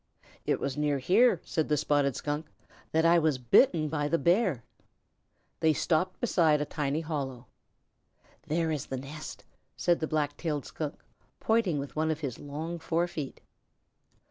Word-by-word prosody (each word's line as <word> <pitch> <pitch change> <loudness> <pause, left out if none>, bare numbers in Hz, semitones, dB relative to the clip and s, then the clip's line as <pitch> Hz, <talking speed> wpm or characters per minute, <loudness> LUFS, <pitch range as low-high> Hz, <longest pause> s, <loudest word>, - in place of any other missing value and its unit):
"It - - +2
was 140 0 -3
near 145 -1 +1
here," 190 - +4
said 160 -2 -1
the 150 - +3
Spotted 140 -1 +2
Skunk, 150 +1 -3 0.4
"that 160 +1 +2
I 170 +1 +6
was 155 -4 +2
bitten 155 - +4
by 145 -1 -1
the 165 - +2
Bear." 170 - +2 1.0
They 160 -1 +4
stopped 175 +5 0
beside 165 -10 +3
a 150 - -1
tiny 150 +1 -2
hollow. 135 -6 -4 1.0
"There 165 +1 0
is 150 -4 -3
the 135 - -3
nest," 150 +4 -8 0.3
said 175 -1 +2
the 155 - -1
Black 145 -2 -1
tailed 150 -5 -2
Skunk, 150 -2 -5 0.4
pointing 220 -8 +2
with 140 0 -5
one 155 +1 +1
of 160 0 -2
his 135 -6 -4
long 160 +4 -5
forefeet. 165 -4 -2
155 Hz, 155 wpm, -29 LUFS, 145-165 Hz, 1.0 s, I